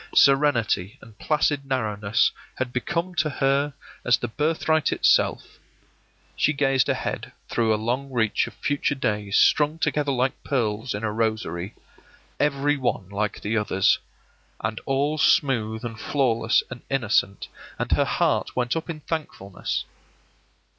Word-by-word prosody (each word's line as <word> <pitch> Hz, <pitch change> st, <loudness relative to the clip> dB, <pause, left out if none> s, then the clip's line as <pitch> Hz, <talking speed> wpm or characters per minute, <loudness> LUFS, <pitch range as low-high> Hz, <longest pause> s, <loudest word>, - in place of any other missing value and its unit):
Serenity 130 Hz, -9 st, +3 dB
and 110 Hz, -3 st, -16 dB
placid 150 Hz, -2 st, +1 dB
narrowness 110 Hz, -5 st, +1 dB, 0.2 s
had 130 Hz, -1 st, -3 dB
become 170 Hz, +8 st, -2 dB
to 155 Hz, -3 st, +1 dB
her 140 Hz, 0 st, +1 dB, 0.3 s
as 120 Hz, -1 st, +4 dB
the 120 Hz, -, -3 dB
birthright 155 Hz, +4 st, +1 dB
itself. -, -, +2 dB, 0.8 s
She 150 Hz, -, +2 dB
gazed 135 Hz, -3 st, +2 dB
ahead -, -, -2 dB, 0.2 s
through 115 Hz, -2 st, +1 dB
a -, -, +4 dB
long 125 Hz, +6 st, -2 dB
reach 115 Hz, -5 st, +1 dB
of -, -, -11 dB
future 145 Hz, 0 st, -1 dB
days 105 Hz, -6 st, -1 dB
strung 150 Hz, +1 st, +4 dB
together 150 Hz, -2 st, 0 dB
like 130 Hz, 0 st, -1 dB
pearls 115 Hz, -4 st, -1 dB
in 100 Hz, -, -5 dB
a 110 Hz, -, 0 dB
rosary, 110 Hz, -4 st, -2 dB, 0.6 s
every 145 Hz, 0 st, +1 dB
one 120 Hz, -8 st, -2 dB
like 100 Hz, +1 st, -2 dB
the 105 Hz, +2 st, -2 dB
others, 100 Hz, -3 st, +2 dB, 0.6 s
and 110 Hz, 0 st, -3 dB
all 145 Hz, +3 st, 0 dB
smooth 110 Hz, -6 st, +2 dB
and 115 Hz, -1 st, -6 dB
flawless 115 Hz, -5 st, +1 dB
and 125 Hz, -, -7 dB
innocent, 110 Hz, -7 st, 0 dB, 0.3 s
and -, -, -3 dB
her -, -, +3 dB
heart -, -, 0 dB
went 125 Hz, -1 st, 0 dB
up 165 Hz, +1 st, -4 dB
in 155 Hz, -2 st, -5 dB
thankfulness. 145 Hz, -, -4 dB
125 Hz, 140 wpm, -24 LUFS, 110-145 Hz, 0.8 s, as